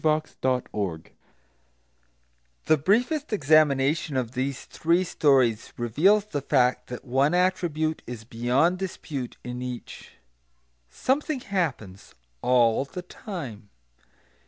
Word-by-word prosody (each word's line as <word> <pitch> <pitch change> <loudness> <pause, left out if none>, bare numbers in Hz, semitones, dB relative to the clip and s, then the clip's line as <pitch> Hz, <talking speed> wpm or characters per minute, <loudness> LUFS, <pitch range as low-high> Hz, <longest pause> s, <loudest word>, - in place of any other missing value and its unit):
The 130 - -1 1.7
briefest 250 - +1
examination 150 -3 +3
of 120 -3 -2
these 130 +1 -3
three 170 +3 +1
stories 130 -10 +2
reveals 170 - +3
the 150 -9 -4
fact 125 -2 +2
that 125 +2 -8
one 135 +6 +2
attribute 170 -4 0
is 120 -2 -7
beyond 125 +10 +1
dispute 150 -9 -5
in 125 0 -5
each. 125 -1 -7 0.8
Something 275 - -1
happens, 140 - -3 0.3
all 120 -1 +3
the 180 +5 -8
time. 140 - -8
140 Hz, 95 wpm, -26 LUFS, 125-180 Hz, 1.7 s, examination